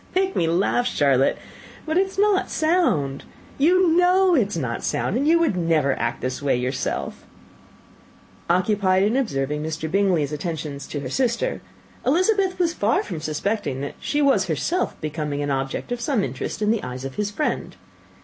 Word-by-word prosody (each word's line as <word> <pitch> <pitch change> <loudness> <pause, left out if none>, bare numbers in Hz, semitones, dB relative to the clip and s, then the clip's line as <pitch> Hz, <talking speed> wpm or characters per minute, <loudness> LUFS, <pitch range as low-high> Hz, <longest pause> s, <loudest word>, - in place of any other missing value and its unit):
"You 375 - +4
make 380 0 -3
me 165 - +1
laugh, 195 +8 +1
Charlotte; 140 - +2 0.5
but 315 0 -2
it 380 +2 +3
is 385 - -12
not 405 -1 +2
sound. 195 - +1 0.4
You 360 +5 +4
know 365 +1 +4
it 245 -11 +3
is 200 - -5
not 125 -6 -3
sound, - - -1
and 275 +4 +1
that - - +4
you 335 - +6
would 335 - +1
never 160 -5 +2
act 115 0 0
in - - -1
this 130 +1 -3
way 140 -2 +2
yourself." 125 +2 -3 1.3
Occupied 185 +1 +2
in 215 +4 +2
observing 150 - -1
Mr. 160 0 -4
Bingley's 180 -7 +2
attention 150 -2 -4
to 145 +1 -6
her 130 - -5
sister, 255 - 0 0.4
Elizabeth 370 - +2
was 345 -2 +1
far 210 -5 +1
from 170 -6 -6
suspecting 155 -2 -2
that 140 - -4
she 295 0 0
was 210 -9 +3
herself 320 - -1
becoming 150 -2 -3
an 145 - -2
object 135 - -3
of 245 -1 -2
some 235 -4 0
interest 130 - -4
in 210 - +3
the 225 - 0
eyes 125 +1 -6
of 135 - -5
his 210 -1 -2
friend. 255 +9 -2
190 Hz, 185 wpm, -23 LUFS, -, 1.3 s, you